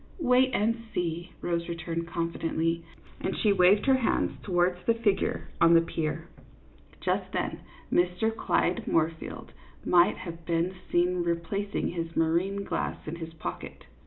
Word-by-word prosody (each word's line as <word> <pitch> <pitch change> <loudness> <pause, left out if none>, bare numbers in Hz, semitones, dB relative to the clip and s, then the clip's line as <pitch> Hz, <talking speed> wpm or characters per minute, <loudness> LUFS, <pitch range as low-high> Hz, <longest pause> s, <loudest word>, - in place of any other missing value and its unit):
" - - -25
Wait 255 -3 +4
and 230 +1 +1
see," 170 +1 -2
Rose 170 -1 -1
returned, 170 0 -3
confidently, 165 -1 -1 0.4
and 190 - -2
she 210 -2 +3
waved 190 +2 +5
her 265 -1 +5
hand 250 - 0
towards 180 -1 +1
the 230 - +4
figure 220 -4 0
on 170 0 +7
the 165 - +7
pier. 160 -2 -3 0.7
Just - - -1
then - - -2 0.3
Mr. 180 +6 +2
Clyde 180 -4 0
Moorfield 160 0 -1 0.3
might 175 -1 +5
have 170 -2 -8
been 170 +2 0 0.2
seen 180 +1 +2
replacing 170 +4 -1
his 165 -1 -4
marine 175 +5 +1
glass - - -2
in 160 +2 -4
his 165 -1 -7
pocket. 160 - -7
175 Hz, 145 wpm, -28 LUFS, 165-200 Hz, 0.7 s, on